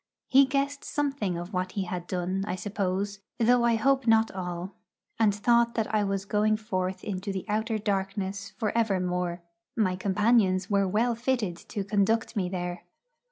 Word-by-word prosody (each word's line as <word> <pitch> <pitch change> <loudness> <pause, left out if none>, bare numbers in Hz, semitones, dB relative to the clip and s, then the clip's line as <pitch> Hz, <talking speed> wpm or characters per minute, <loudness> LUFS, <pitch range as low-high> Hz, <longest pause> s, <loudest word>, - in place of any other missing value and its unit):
He 270 +1 +5
guessed 275 +1 -1
something 275 - -1
of 175 +4 -7
what 185 0 -2
he 200 - -1
had 175 -1 -5
done, 185 +1 -1
I 180 - -1
suppose, 200 0 -2 0.2
though 240 +1 +4
I 235 -1 +4
hope 270 +3 +2
not 225 0 +4
all; 180 0 -5 0.5
and 210 -3 +4
thought 235 +2 +3
that 220 -1 -1
I 210 -1 +3
was 195 -1 -1
going 215 +1 +2
forth 190 -4 -3
into 200 0 -3
the 190 -1 -4
outer 220 +1 0
darkness 200 -1 -2
for 215 +1 -1
evermore. 180 -5 0 0.3
My 190 -5 +2
companions 195 0 +2
were 200 -1 +3
well 225 +5 +2
fitted 235 -6 -1
to 205 -4 -3
conduct 210 +4 +1
me 185 -4 0
there. 180 -1 -4
200 Hz, 165 wpm, -28 LUFS, 185-225 Hz, 0.5 s, He